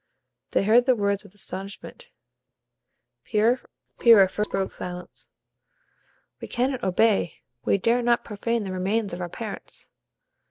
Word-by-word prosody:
They -, -, +1 dB
heard 235 Hz, +5 st, +4 dB
the 255 Hz, -, +5 dB
words 200 Hz, -2 st, 0 dB
with 190 Hz, -, -17 dB
astonishment. 200 Hz, -, -6 dB, 1.1 s
Pyrrha 230 Hz, +3 st, +2 dB, 0.7 s
first 210 Hz, +2 st, -2 dB
broke 195 Hz, -1 st, -1 dB
silence: 180 Hz, 0 st, -7 dB, 1.1 s
"We -, -, -7 dB
cannot 255 Hz, +1 st, -1 dB
obey; 195 Hz, -1 st, +1 dB, 0.2 s
we -, -, +3 dB
dare 230 Hz, +5 st, +2 dB
not 240 Hz, 0 st, +2 dB
profane 230 Hz, +2 st, -2 dB
the 190 Hz, -, -5 dB
remains 195 Hz, +2 st, -1 dB
of 175 Hz, -, -5 dB
our 175 Hz, -, -3 dB
parents." 215 Hz, +2 st, -7 dB
210 Hz, 125 wpm, -25 LUFS, 190-235 Hz, 1.1 s, the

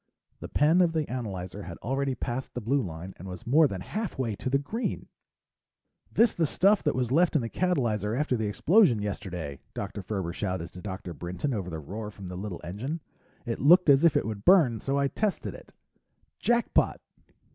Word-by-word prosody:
The -, -, -6 dB
pen 160 Hz, +5 st, +4 dB
of 170 Hz, -2 st, +3 dB
the 155 Hz, -2 st, 0 dB
analyzer 100 Hz, -6 st, -5 dB
had 85 Hz, -3 st, -8 dB
already 135 Hz, +2 st, -1 dB
passed 125 Hz, +2 st, -4 dB
the -, -, -1 dB
blue 135 Hz, +5 st, +1 dB
line 90 Hz, -2 st, -6 dB
and 95 Hz, -, -9 dB
was 90 Hz, -1 st, -8 dB
more 150 Hz, +6 st, +5 dB
than 95 Hz, -7 st, -5 dB
halfway 135 Hz, -, -3 dB
to -, -, -3 dB
the 140 Hz, -, +3 dB
green! 215 Hz, -, -4 dB, 1.0 s
"This 230 Hz, +1 st, +4 dB
the 165 Hz, -2 st, +1 dB
stuff 200 Hz, +7 st, +3 dB
that -, -, 0 dB
was 125 Hz, -2 st, -1 dB
left 170 Hz, +4 st, +3 dB
in 140 Hz, -, +3 dB
the 115 Hz, -, -4 dB
catalyzer 120 Hz, -, 0 dB
after 150 Hz, -4 st, +1 dB
the 110 Hz, -2 st, -1 dB
explosion 135 Hz, -, +4 dB
yesterday!" 90 Hz, -8 st, -5 dB, 0.2 s
Dr. 100 Hz, -, -4 dB
Ferber 95 Hz, -3 st, -3 dB
shouted 90 Hz, -4 st, -3 dB
to 90 Hz, -, -9 dB
Dr. 95 Hz, -3 st, -6 dB
Brinton 90 Hz, -, -3 dB
over 95 Hz, -5 st, -3 dB
the 80 Hz, -, -4 dB
roar 105 Hz, +8 st, -6 dB
from 100 Hz, -3 st, -9 dB
the 90 Hz, -, -6 dB
little 95 Hz, -1 st, -5 dB
engine. 125 Hz, -, -4 dB, 0.5 s
"It 115 Hz, -2 st, -3 dB
looked 165 Hz, +3 st, +6 dB
as 140 Hz, +3 st, +5 dB
if 165 Hz, -3 st, +5 dB
it -, -, 0 dB
would 105 Hz, -2 st, -5 dB
burn, 150 Hz, -, +5 dB
so 135 Hz, +6 st, -1 dB
I 140 Hz, 0 st, +2 dB
tested 210 Hz, +7 st, -2 dB
it. -, -, -13 dB, 0.7 s
Jackpot!" 240 Hz, 0 st, +2 dB
120 Hz, 195 wpm, -28 LUFS, 95-150 Hz, 1.0 s, looked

